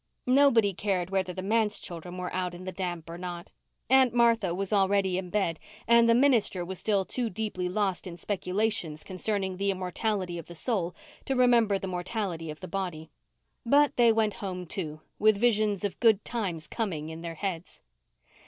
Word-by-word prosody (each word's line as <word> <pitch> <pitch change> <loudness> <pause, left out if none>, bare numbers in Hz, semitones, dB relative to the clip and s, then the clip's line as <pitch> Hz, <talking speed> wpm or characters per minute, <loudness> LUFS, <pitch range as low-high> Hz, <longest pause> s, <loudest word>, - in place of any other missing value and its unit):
Nobody 250 -6 +4
cared 185 -2 -1
whether 190 -2 0
the 185 +1 -6
manse 215 +1 +1
children 175 +1 -7
were 180 0 -4
out 180 -1 -2
in 180 - -9
the 185 - -4
damp 175 -3 -4
or 170 +1 -7
not. 175 0 -6 0.4
Aunt 260 -2 +5
Martha 230 -6 +3
was 195 +2 -2
already 195 -1 +2
in 185 -1 -6
bed 175 -5 0 0.3
and 235 0 +6
the 230 - +6
minister 235 -9 +3
was 190 +1 -4
still 200 -3 +1
too 240 +2 -2
deeply 185 -3 -3
lost 190 -1 -1
in 170 -1 -7
speculations 185 -3 -2
concerning 190 0 -2
the 200 +1 0
immortality 185 -1 -2
of 165 - -10
the 175 - -10
soul 180 -3 -1 0.3
to 270 - 0
remember 235 -5 +4
the 195 - -6
mortality 180 -2 -3
of 155 +3 -8
the 185 - -6
body. 180 -5 -4 0.5
But 285 +4 +4
they 235 -2 +5
went 220 -2 +1
home, 185 -3 -5
too, 155 -3 -5 0.2
with 215 -1 +4
visions 215 -3 +2
of 205 - -3
good 220 -4 +4
times 185 -9 -3
coming 165 -9 -3
in 160 +1 -7
their 165 -1 -6
heads. 180 -1 -5
195 Hz, 180 wpm, -28 LUFS, 180-220 Hz, 0.5 s, and